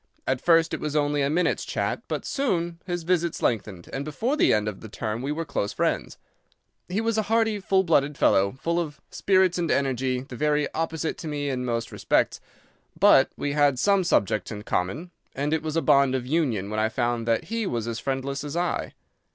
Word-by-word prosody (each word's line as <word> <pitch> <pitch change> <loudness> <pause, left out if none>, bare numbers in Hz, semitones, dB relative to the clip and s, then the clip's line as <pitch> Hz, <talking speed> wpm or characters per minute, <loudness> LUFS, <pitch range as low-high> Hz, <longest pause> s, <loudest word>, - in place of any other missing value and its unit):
At 130 -1 0
first 165 -1 +4
it - - -2
was 150 -1 -3
only 145 -1 +1
a 140 - +1
minute's 175 +4 +1
chat, - - -2
but - - -3
soon 175 -11 -1
his 175 -2 -2
visits 170 -1 0
lengthened, 100 -6 -1
and 135 - -2
before 225 - -1
the - - +4
end 105 -1 +2
of 105 -2 -5
the 110 - -9
term 110 +2 -4
we 140 +3 -2
were 165 +2 -3
close 105 -8 -2
friends. - - -1 0.7
He 185 +4 -1
was 225 -1 0
a 215 - -3
hearty, 225 -2 +2
full 190 0 +2
blooded 150 -4 +2
fellow, 100 +1 +3
full 170 +3 0
of 150 -4 -4
spirits 185 -2 +2
and 170 -2 -1
energy, 130 -2 0
the 130 -1 -9
very 150 +2 +1
opposite 160 0 -2
to 165 - -6
me 145 -2 -2
in 125 -1 -2
most 115 -1 -2
respects, - - +1 0.6
but - - +6
we 145 - -2
had 145 -2 +3
some 200 +6 +3
subjects 105 - +1
in 105 -1 -6
common, 130 - -2 0.2
and 145 +3 -1
it 160 - +1
was 155 0 -4
a 165 - +1
bond 140 -1 +4
of 125 -2 -2
union 125 - 0
when 110 - -1
I 110 +1 +2
found 120 0 -1
that 115 -1 +2
he 225 -1 -2
was 115 -6 -2
as 115 -1 -3
friendless 135 +1 -3
as 145 +2 -4
I. 175 0 -2
145 Hz, 210 wpm, -25 LUFS, 125-170 Hz, 0.7 s, but